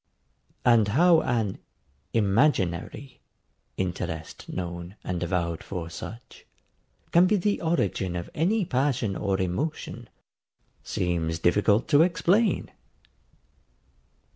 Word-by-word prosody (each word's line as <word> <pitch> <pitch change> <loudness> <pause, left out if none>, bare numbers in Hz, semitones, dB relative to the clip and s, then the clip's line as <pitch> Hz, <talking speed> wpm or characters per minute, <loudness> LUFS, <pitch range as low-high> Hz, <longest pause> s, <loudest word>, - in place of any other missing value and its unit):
And 115 -4 +5
how 165 +9 +5
an 110 -5 -1 0.6
IMAGINARY 110 - +1 0.6
interest 85 -3 -4
known 85 +1 -5
and 90 -1 -3
avowed 85 -1 -1
for 85 -3 -6
such, 115 +7 -9 0.7
can 175 +2 +6
be 210 - +3
the 205 +1 0
origin 100 - 0
of 85 -1 -4
any 195 +6 +1
passion 130 - 0
or 95 +1 -1
emotion, 95 - -3 0.7
seems 85 -2 -1
difficult 100 +6 +2
to 145 0 +6
explain. 185 +6 +2
105 Hz, 95 wpm, -26 LUFS, -, 0.7 s, can